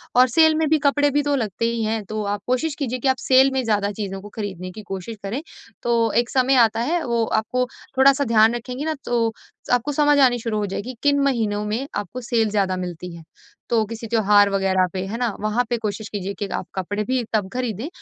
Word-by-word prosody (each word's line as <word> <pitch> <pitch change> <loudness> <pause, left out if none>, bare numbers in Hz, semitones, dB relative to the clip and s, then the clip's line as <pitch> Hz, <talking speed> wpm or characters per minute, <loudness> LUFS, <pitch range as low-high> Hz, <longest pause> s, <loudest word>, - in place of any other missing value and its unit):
और 250 +1 +7
सेल 315 +3 +5
में 315 -1 +1
भी 315 - +4
कपड़े 290 +1 +3
भी 290 +1 +2
तो 290 -1 +1
लगते 225 -3 -2
ही 230 -1 -1
हैं, 220 0 -1
तो 215 +1 -4
आप 205 0 -2
कोशिश 275 +4 0
कीजिए 255 -2 -2
कि 270 - -1
आप 260 -1 +3
सेल 265 +1 +4
में 265 -1 0
ज़्यादा 205 -3 0
चीज़ों 195 -2 -5
को 205 - -10
खरीदने 185 -4 -5
की 215 - -9
कोशिश 195 +4 -5
करें। 225 +9 -3 0.4
तो 230 -2 +2
एक 240 - -17
समय 260 0 +2
आता 225 +1 -2
है, 330 +6 0
वो 235 -1 0
आपको 250 +4 0 0.3
थोड़ा-सा 275 +1 +5
ध्यान 220 +2 +5
रखेंगी 250 +4 -5
न, 315 -1 -1
तो 230 -2 +1 0.4
आपको 245 +4 +1
समझ 295 0 +3
आनी 250 -3 +5
शुरू 225 -2 -2
हो 205 - 0
जाएगी 230 +6 -5
किन 285 -1 +3
महीनों 220 -6 0
में 230 +6 -2
आपको 250 +5 -4
सेल 230 -2 +1
ज़्यादा 195 -3 0
मिलती 180 -1 -6
है। 165 - -11 0.5
तो 225 -2 +3
किसी 230 +1 -7
त्योहार 205 -2 +4
वगैरह 190 -1 +2
पे, 185 0 -3
है 225 +3 -4
ना? 245 - 0
वहाँ 215 +3 +1
पे 240 - 0
कोशिश 210 +1 -3
कीजिए 200 -1 -4
कि 205 - -2
आप - - -3
कपड़े 205 +3 -2
भी 255 +2 -1
तब 205 -3 0
खरीदें 250 0 -3
230 Hz, 225 wpm, -22 LUFS, 205-255 Hz, 0.5 s, और